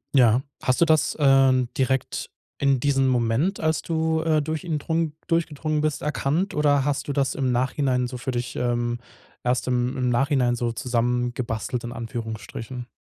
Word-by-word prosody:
Ja. 120 -1 +5 0.2
Hast 130 +4 +1
du - - +7
das, 155 -1 +2
ähm, 135 -3 +5
direkt 130 0 -1 0.3
in 140 -2 +3
diesem 135 -1 +2
Moment, 125 - +1
als 160 0 +1
du, 160 -1 0
äh, 155 -2 +2
durch 160 +3 -3
ihn 160 -4 -2
drung 160 0 -1
durchgedrungen 155 -2 0
bist, 155 -2 -1
erkannt? 150 +6 -1
Oder 145 -2 +3
hast 145 0 -1
du 140 - -1
das 135 -1 0
im 130 -2 0
Nachhinein 125 0 +1
so 125 0 -6
für 130 +1 -3
dich, 120 0 -3
ähm 120 -1 -1 0.4
erst 125 +1 0
im 125 0 0
im 125 -1 +1
Nachhinein 125 0 +2
so 120 -1 -1
zusammengebastelt 120 0 -1
in 120 - -5
Anführungsstrichen? 115 +1 -6
130 Hz, 165 wpm, -24 LUFS, 120-150 Hz, 0.4 s, du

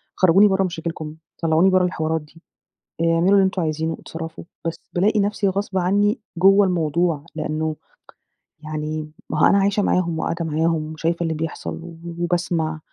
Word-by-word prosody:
خرجوني 190 +3 +6
برّه 195 -1 +2
مشاكلكم، 165 -3 -4 0.3
طلعوني 165 +3 +4
برّه 185 -1 +4
الحوارات 160 -2 -1
دي، 150 +2 -18 0.6
اعملوا 165 +3 +3
اللي 200 - +6
أنتم 190 -1 0
عايزينه، 160 +1 -1
اتصرفوا. 165 0 -7 0.2
بس 165 - -3
بالاقي 210 +4 +3
نفسي 205 0 +1
غصب 195 0 -1
عنّي 205 +5 +2 0.2
جوّه 195 +2 +6
الموضوع، 165 -3 0
لأنّه 155 0 -2 0.9
يعني 155 0 -4 0.2
مأهو 150 - +3
أنا 200 - +5
عايشة 200 +1 +2
معاهم 170 -4 +1
وقاعدة 170 +1 -2
معاهم 160 0 0
وشايفة 165 +2 -1
اللي 165 -1 -1
بيحصل 160 +1 -5 0.4
وباسمع. 170 -2 -1
165 Hz, 145 wpm, -22 LUFS, 160-190 Hz, 0.9 s, خرجوني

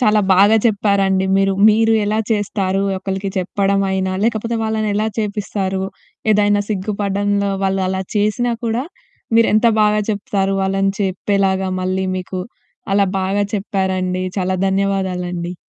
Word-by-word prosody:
చాలా 215 -3 +4
బాగా 200 +4 +5
చెప్పారండి 200 -3 +1
మీరు. 195 0 +2 0.2
మీరు 225 +1 +3
ఎలా 210 +1 0
చేస్తారు, 200 -3 0 0.2
ఒకళ్ళకి 195 +1 -3
చెప్పడమయినా, 190 0 0
లేకపోతే 230 0 -1
వాళ్ళనెలా 215 -1 0
చేపిస్తారు, 200 -2 -2 0.5
ఏదైనా 205 0 +3
సిగ్గుపడ్డంలో 200 0 -1
వాళ్ళు 195 0 0
అలా 190 0 -2
చేసినా 215 +4 +1
కూడా, 230 +2 0 0.5
మీరెంత 230 0 +4 0.2
బాగా 210 0 +3
చెప్తారు 195 -1 -1
వాళ్ళని 195 0 +1
చెప్పేలాగా. 190 0 0
మళ్ళీ 185 +1 -1
మీకు 185 0 -5 0.5
అలా 200 0 +3
బాగా 195 +2 0
చెప్పారండి. 190 -2 -1
చాలా 185 0 0
ధన్యవాదాలండి. 185 -3 -1
195 Hz, 115 wpm, -18 LUFS, 190-210 Hz, 0.5 s, బాగా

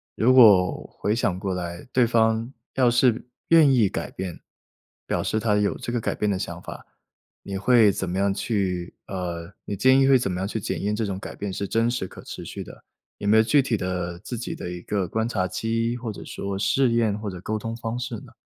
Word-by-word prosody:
如 125 +3 +4
果 105 -8 +6
回 105 - +1
想 95 -6 0
过 95 -1 -2
来， 85 -1 -5
对 125 -1 +4
方 115 +1 +2 0.2
要 130 -2 +4
是 120 -1 +2 0.2
愿 160 -4 +7
意 115 -5 +4
改 - - -4
变， 90 -3 -6 0.7
表 - - -1
示 110 - 0
她 105 -1 +1
有 105 0 +1
这 - - -5
个 120 - 0
改 - - -1
变 105 - 0
的 100 - 0
想 - - -5
法。 - - -9 0.6
你 100 -1 -4
会 110 0 +5
怎 95 -1 -3
么 90 - -2
样 100 0 +2
去 95 -5 -2
呃， 90 -2 -5
你 100 - -3
建 130 +7 +5
议 135 - +4
会 135 -1 +6
怎 105 -6 -1
么 90 - -3
样 95 - -1
去 110 - -3
检 - - -3
验 105 +1 0
这 110 +1 -1
种 95 -2 -3
改 - - -8
变 100 -1 -4
是 100 +1 -3
真 115 +4 +1
实 120 -6 -2
可 - - -12
持 - - -8
续 - - -6
的， - - -13 0.3
有 100 - -4
没 105 - +5
有 110 - +6
具 140 +5 +4
体 120 -3 0
的 90 -3 -3
自 120 +5 -6
己 120 - -5
的 90 - -6
一 90 - -6
个 100 -3 -1
观 110 0 0
察 100 -6 0
期， 115 +3 -1
或 120 -2 -5
者 - - -9
说 100 0 -5
试 125 +5 +2
验 110 -3 +1
或 105 -1 -4
者 90 -2 -8
沟 110 +2 -2
通 115 +1 -5
方 115 +1 -4
式 125 -1 -4
呢？ - - -14
105 Hz, 255 characters per minute, -24 LUFS, 95-120 Hz, 0.7 s, 愿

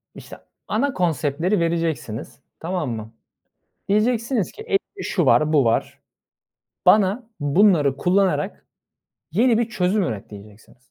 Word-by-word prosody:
işte, - - -11 0.3
ana 270 +6 0
konseptleri 165 +2 0
vereceksiniz, 165 -8 -3 0.2
tamam 170 -5 -3
mı? 110 0 -7 0.7
Diyeceksiniz 225 +1 +1
ki: 435 - -12
"Elimde 410 -3 -3
şu - - 0
var, 155 +1 +3
bu 140 -5 +4
var. 115 - 0 0.9
Bana 215 +3 +3
bunları 145 -2 +3
kullanarak 185 +4 0 0.7
yeni 230 +5 +3
bir 235 -1 0
çözüm 190 0 0
üret." 110 - -5
diyeceksiniz. 105 +3 -14
180 Hz, 115 wpm, -22 LUFS, 140-215 Hz, 0.9 s, bu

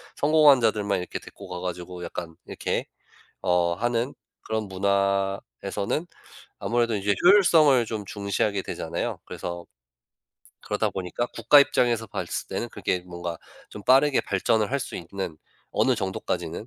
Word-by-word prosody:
성공한 150 -3 +5
자들만 105 -3 +1
이렇게 90 - -5
데리고 100 -2 -12
가 90 -1 -5
가지고 90 0 -5
약간 85 -2 -7
이렇게 - - -2 0.6
어 90 -2 +2
하는 120 +6 -1 0.3
그런 110 0 -1
문화에서는 100 - -1 0.6
아무래도 120 -1 +1
이제 100 0 +1
효율성을 165 - +6
좀 110 -2 -4
중시하게 100 0 -1
되잖아요. - - -4
그래서 85 0 -6 0.9
그러다 - - -1
보니까 95 +5 -3
국가 145 - +7
입장에서 120 -4 +2
봤을 - - -4
때는 - - -3
그게 90 - -2
뭔가 85 -1 -5 0.3
좀 105 - -9
빠르게 135 +2 +5
발전을 105 +2 +1
할 140 - +1
수 - - -5
있는 85 -2 -6 0.3
어느 130 - +2
정도까지는 95 -2 -3
100 Hz, 330 characters per minute, -25 LUFS, 90-120 Hz, 0.9 s, 국가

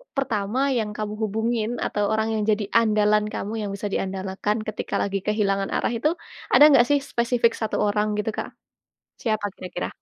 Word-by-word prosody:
pertama 230 -4 -1 0.2
yang 220 -2 -1
kamu 210 -1 -3
hubungin 220 +1 -1 0.2
atau 205 - -1
orang 220 0 +1
yang 215 - 0
jadi 210 0 +1 0.2
andalan 210 -1 +3
kamu, 205 - -4
yang 205 - -3
bisa 205 +1 -4
diandalkan 190 +2 -2
ketika 215 - -4
lagi 200 0 -1
kehilangan 200 -2 +1
arah - - 0
itu, 300 +7 +2 0.4
ada - - +8
nggak 245 -3 +6
sih 285 -1 +4
spesifik 235 0 +2
1 220 - -1
orang 210 +1 +1
gitu 210 +1 -1
Kak? - - -3 0.7
Siapa 215 -3 0
kira-kira? 180 -1 -5
215 Hz, 170 wpm, -24 LUFS, 205-225 Hz, 0.7 s, ada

